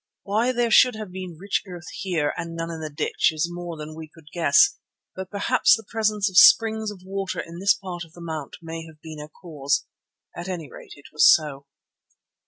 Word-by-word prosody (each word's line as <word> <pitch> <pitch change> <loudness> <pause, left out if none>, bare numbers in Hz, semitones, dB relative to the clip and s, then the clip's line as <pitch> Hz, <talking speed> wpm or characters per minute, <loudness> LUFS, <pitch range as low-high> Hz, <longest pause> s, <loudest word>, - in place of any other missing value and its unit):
Why 220 +5 +1
there 240 -2 0
should 250 +2 +6
have 215 -3 -7
been 185 -3 -7
rich 200 +4 -1
earth 175 -1 -9
here 170 -6 -1
and 165 0 -6
none 165 0 -4
in 165 - -6
the 155 - -4
ditch 145 - 0
is 160 +1 -1
more 175 -1 -7
than 155 0 -8
we 160 0 -9
could 155 -1 -18
guess, 170 - +4 0.4
but 190 -1 -6
perhaps 200 -1 +3
the 225 - -12
presence 215 -2 +1
of 185 -3 +5
springs 220 -1 +6
of 195 -3 -10
water 195 -2 -4
in 165 +1 -7
this 200 +2 +4
part 180 -4 -7
of 165 -1 -16
the 175 - -14
mount 160 -4 -6
may 165 0 -6
have 155 -1 -16
been 155 -1 -10
a 150 0 -9
cause. 150 -5 -2 0.5
At 175 +2 -6
any 175 -4 -5
rate 455 -5 -12
it - - -18
was 390 - +7
so. 140 - 0
175 Hz, 210 wpm, -24 LUFS, 160-200 Hz, 0.5 s, was